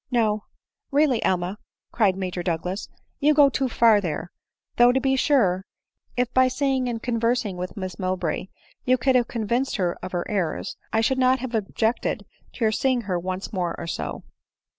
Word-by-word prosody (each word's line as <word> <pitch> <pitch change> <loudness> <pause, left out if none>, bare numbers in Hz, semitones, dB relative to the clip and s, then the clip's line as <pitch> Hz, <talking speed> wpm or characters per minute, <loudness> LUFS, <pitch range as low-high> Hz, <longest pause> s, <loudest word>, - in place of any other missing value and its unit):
\ - - -61
" - - -43
No; 215 -3 +1 0.5
really, 280 -4 +3
Emma," 185 +3 0 0.3
cried 205 -5 +2
Major 185 -2 -3
Douglas, 180 +3 -3
" - - -45
you 300 +1 +4
go 285 -1 +7
too 265 -1 -1
far 225 -3 +5
there; 170 -1 -4 0.5
though 240 0 +7
to 265 - +2
be 265 0 +2
sure, 210 -10 +2 0.5
if 245 -1 0
by 260 0 +5
seeing 260 -1 0
and 230 -1 -4
con 235 -2 -1
versing 230 -4 0
with 180 +2 -6
Miss 185 -3 -5
Mowbray 185 0 -2 0.4
you 255 0 +3
could 260 +2 +2
have 245 -2 +3
convinced 235 +3 -1
her 180 -3 0
of 185 - -6
her 175 -1 -1
errors, 185 -6 -2 0.2
I 220 - +2
should 260 +4 +1
not 255 0 +4
have 255 -1 -6
objected 220 +2 -1 0.3
to 230 - -1
your 215 - +3
seeing} 255 +2 +1
her 185 -5 -2
once 185 +3 -4
more 180 -3 -1
or 170 - -5
so." 165 - -4
225 Hz, 195 wpm, -24 LUFS, 185-255 Hz, 0.5 s, go